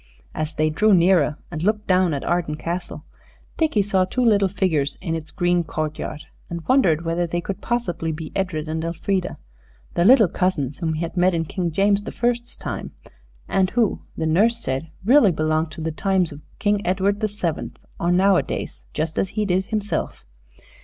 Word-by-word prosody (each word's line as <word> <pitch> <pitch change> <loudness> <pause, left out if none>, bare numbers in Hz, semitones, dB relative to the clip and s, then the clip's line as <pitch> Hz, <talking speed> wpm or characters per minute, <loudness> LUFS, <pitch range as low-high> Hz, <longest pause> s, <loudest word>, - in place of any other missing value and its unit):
As 155 0 -3
they 155 0 +1
drew 210 +5 +4
nearer, 170 -4 +3
and 160 -2 -4
looked 210 +3 +1
down 185 -4 +3
at 140 - -4
Arden 175 -3 0
Castle, 170 +3 -5 0.5
Dickie 310 -11 +2
saw 190 -2 +2
two 250 +7 0
little 205 -3 +4
figures 165 -7 0
in 170 -3 -3
its 160 -1 -4
green 175 -2 +1
courtyard, 155 -1 -4 0.3
and 170 -2 -6
wondered 170 - +3
whether 170 +1 0
they 175 +1 -1
could 195 +3 -5
possibly 230 -9 -1
be 155 0 -6
Edred 175 -5 -2
and 160 +1 -2
Elfrida, 180 +2 -2 0.6
the 170 - +2
little 225 0 +7
cousins 155 -7 -1
whom 165 -3 -1
he 155 - -3
had 170 +1 -4
met 180 0 +3
in 165 0 0
King 175 +1 -2
James 200 +4 +2
the 205 - -6
First's 240 0 -1
time, - - -5 0.5
and 190 -1 +2
who, 230 -2 +1 0.2
the 160 - -1
nurse 210 +9 +3
said, 135 - -3 0.2
really 245 -4 +6
belonged 155 0 0
to 160 - -7
the 160 +1 -2
times 185 +1 +1
of 145 +1 -10 0.2
King 205 -1 +1
Edward 195 +3 +1
the 215 - +1
Seventh, 185 -6 -3 0.2
or 170 - +1
Nowadays, 190 +1 +1
just 155 +1 -1
as 190 - 0
he 210 +1 -1
did 190 0 +1
himself. 210 - -3
180 Hz, 185 wpm, -22 LUFS, 160-200 Hz, 0.6 s, little